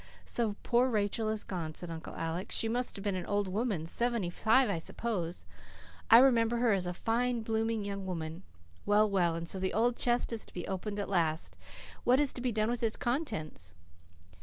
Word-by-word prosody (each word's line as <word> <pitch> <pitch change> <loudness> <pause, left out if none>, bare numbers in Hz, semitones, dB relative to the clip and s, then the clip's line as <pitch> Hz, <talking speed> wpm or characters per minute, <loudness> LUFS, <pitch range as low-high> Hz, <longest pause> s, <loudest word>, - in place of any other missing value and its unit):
"So 225 -4 0
poor 245 +2 +3
Rachel 215 0 0
is 215 -1 -2
gone," 165 -5 -5
said 175 -1 -4
Uncle 160 -1 -7
Alec. 165 +3 -3
"She 225 - 0
must 245 +2 -1
have 195 - -7
been 205 -2 0
an 185 -1 -4
old 205 -1 0
woman 200 -4 -1
seventy 235 0 0
five 225 +8 +3
I 200 -5 -1
suppose. 175 - -3 0.6
I 225 - +10
remember 235 -2 +5
her 235 -2 +3
as 185 -2 0
a 180 - -2
fine, 235 +3 0
blooming 225 -1 -1
young 200 -1 -4
woman. 165 -1 -4 0.4
Well, 210 +1 +4
well, 180 -5 +1
and 165 0 -4
so 190 - +1
the 185 0 -1
old 235 +2 +2
chest 240 -1 +1
is 225 - -3
to - - -16
be 175 - -4
opened 200 +2 -3
at 200 - -2
last. 165 -4 0 0.5
What 255 +2 +4
is 290 -2 +2
to 245 - -6
be 250 -1 0
done 215 +1 +1
with 240 - -3
its 225 -2 +1
contents?" 210 - -3
210 Hz, 205 wpm, -31 LUFS, 180-235 Hz, 0.6 s, I